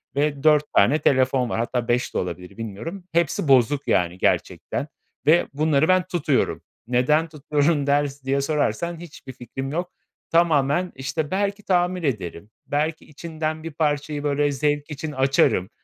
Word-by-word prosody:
ve 145 0 0
4 150 -1 +5
tane 140 +10 +4
telefon 130 -2 +2
var. 115 - -2
Hatta, 120 0 -2
5 120 +1 0
de - - -2
olabilir 90 +1 -5
bilmiyorum. 115 - -6
Hepsi 170 -1 0
bozuk, 135 +1 +3
yani, 90 0 +1
gerçekten - - -1 0.4
ve 165 +3 +4
bunları 155 0 +2
ben 185 0 +4
tutuyorum. 155 -6 0 0.3
Neden 140 +6 +2
tutuyorum 150 -1 0
der 145 0 +2 0.2
diye 135 +1 +1
sorarsan, 160 +3 -1
hiçbir 145 -6 -11
fikrim 135 +3 -6
yok. 175 +3 -3 0.4
Tamamen, 165 +1 +2
işte, 145 +4 -3
belki 200 +1 -1
tamir 180 -1 +1
ederim, 100 - -3 0.2
belki 155 +2 -2
içinden 155 0 -5
bir 165 - -5
parçayı, 145 -1 -1
böyle, 145 0 +1
zevk 145 +2 -1
için 150 +1 -5
açarım. 130 -8 +2
145 Hz, 150 wpm, -23 LUFS, 130-160 Hz, 0.4 s, 4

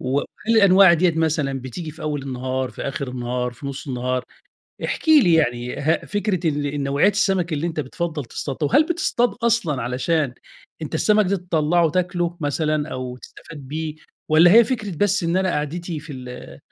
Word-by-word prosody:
وهل 135 +2 0 0.3
الأنواع 195 -3 +7
ديّة 170 0 +2
مثلًا 150 -4 0
بتيجي 155 +6 -6
في 160 - -12
أول 150 -2 -2
النهار، 130 -1 -3
في - - -8
آخر 135 0 -4
النهار 125 0 -3
في 130 +4 -10
نُص 140 +1 -6
النهار؟ 125 0 -2 0.6
احكِ - - -4
لي 275 - +6
يعني 120 -5 0
ه 155 +3 0
فكرة 200 -4 -1
ال 145 -1 -1
النوعيات 140 +7 +2
السَمَك 190 -4 +1
اللي 155 +2 -1
أنت 160 -2 -2
بتفضّل 155 +1 -4
تصطادها، 140 +4 -3
وهل 305 - +4
بتصطاد 280 -8 0
أصلًا 180 - +1
علشان 130 +2 -1 0.5
أنت 150 - -5
السَمَك 210 -1 +3
دي 200 - +1
تطلّعه 170 -2 +1
تاكله 175 -1 -1
مثلًا 150 +1 -1
أو 130 -2 -5
تستفاد 155 +4 -13
بيه، 155 +1 -4 0.3
والّا 165 +3 +6
هي 235 +1 +8
فكرة 210 -8 -3
بس 205 +1 +1
إن 170 +2 +1
أنا 190 0 +1
قعدتي 160 +2 -3
في 150 -1 -10
ال 125 -1 -9
155 Hz, 170 wpm, -22 LUFS, 135-180 Hz, 0.6 s, هي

